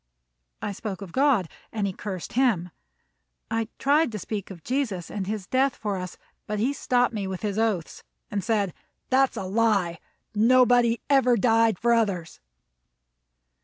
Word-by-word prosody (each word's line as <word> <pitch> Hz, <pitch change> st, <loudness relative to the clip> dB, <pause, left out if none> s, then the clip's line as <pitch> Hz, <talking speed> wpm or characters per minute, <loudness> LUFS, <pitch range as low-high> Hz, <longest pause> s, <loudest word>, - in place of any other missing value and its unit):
I -, -, -1 dB
spoke 200 Hz, -1 st, -5 dB
of 185 Hz, -, -10 dB
God, 265 Hz, -, +3 dB, 0.2 s
and 215 Hz, -2 st, -1 dB
he 195 Hz, -, -2 dB
cursed 190 Hz, -3 st, -6 dB
him. 225 Hz, -9 st, +2 dB, 0.8 s
I 225 Hz, -1 st, 0 dB
tried 290 Hz, 0 st, +3 dB
to -, -, -2 dB
speak 205 Hz, 0 st, -5 dB
of 175 Hz, -5 st, -10 dB
Jesus 235 Hz, -10 st, -2 dB
and 195 Hz, -3 st, -4 dB
his 210 Hz, -2 st, -3 dB
death 265 Hz, +5 st, +1 dB
for 205 Hz, -2 st, -3 dB
us, 180 Hz, -1 st, -6 dB, 0.3 s
but 210 Hz, -, -2 dB
he 245 Hz, +7 st, +1 dB
stopped 245 Hz, -3 st, +1 dB
me 205 Hz, -3 st, -3 dB
with 190 Hz, +1 st, -5 dB
his 210 Hz, 0 st, -1 dB
oaths, 210 Hz, -7 st, -1 dB, 0.3 s
and 200 Hz, -2 st, -2 dB
said: 205 Hz, -4 st, 0 dB, 0.4 s
"That's 265 Hz, 0 st, +3 dB
all 190 Hz, -, -3 dB
a -, -, -4 dB
lie. 200 Hz, -7 st, +2 dB, 0.3 s
Nobody 240 Hz, +1 st, +4 dB
ever 260 Hz, -4 st, +4 dB
died 225 Hz, -2 st, +3 dB
for 235 Hz, +4 st, +2 dB
others." 195 Hz, -8 st, 0 dB
215 Hz, 165 wpm, -26 LUFS, 195-245 Hz, 0.8 s, Nobody